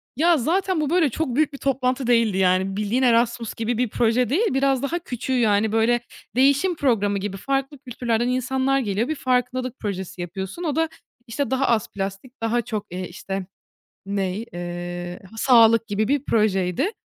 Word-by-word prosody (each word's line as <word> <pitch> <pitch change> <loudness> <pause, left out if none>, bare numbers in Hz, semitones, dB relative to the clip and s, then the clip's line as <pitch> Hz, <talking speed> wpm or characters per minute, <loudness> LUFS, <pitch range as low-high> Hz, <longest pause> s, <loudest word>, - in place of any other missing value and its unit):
Ya, 330 +3 +4
zaten 355 +5 0
bu 295 - -1
böyle 335 -4 +3
çok 255 -1 -2
büyük 305 -1 +2
bir - - -6
toplantı 260 -2 0
değildi 230 -5 +3
yani. 190 +1 +2
Bildiğin 215 +5 0
Erasmus 235 -1 +2
gibi 230 +1 -2
bir 245 -3 0
proje 240 +2 +1
değil, 360 - +1
biraz 270 -1 +2
daha 335 +5 -1
küçüğü. 260 -4 -4
Yani, 210 -1 +2
böyle, 225 +2 +3 0.4
değişim 280 +8 +3
programı 210 -9 +1
gibi, 195 0 -4
farklı 275 +5 -2
kültürlerden 240 -3 -1
insanlar 260 +2 +1
geliyor. 215 +1 -1
Bir 315 - -1
farkındalık 255 -1 -1
projesi 190 -3 -5
yapıyorsun. 190 - -6
O 305 -4 -1
da, 325 0 +1 0.4
işte, 265 +2 -2
daha 265 +1 +1
az 230 -3 +1
plastik, 195 +6 -6
daha 230 +1 +1
çok, 210 -2 -4
eee, 180 0 -4
işte, 190 +2 -5 0.6
ney? 200 +2 -2
Eee, 175 0 -5 0.2
sağlık 230 -2 +5
gibi 210 +1 -1
bir 285 0 +1
projeydi. 210 - +1
240 Hz, 170 wpm, -23 LUFS, 205-270 Hz, 0.6 s, sağlık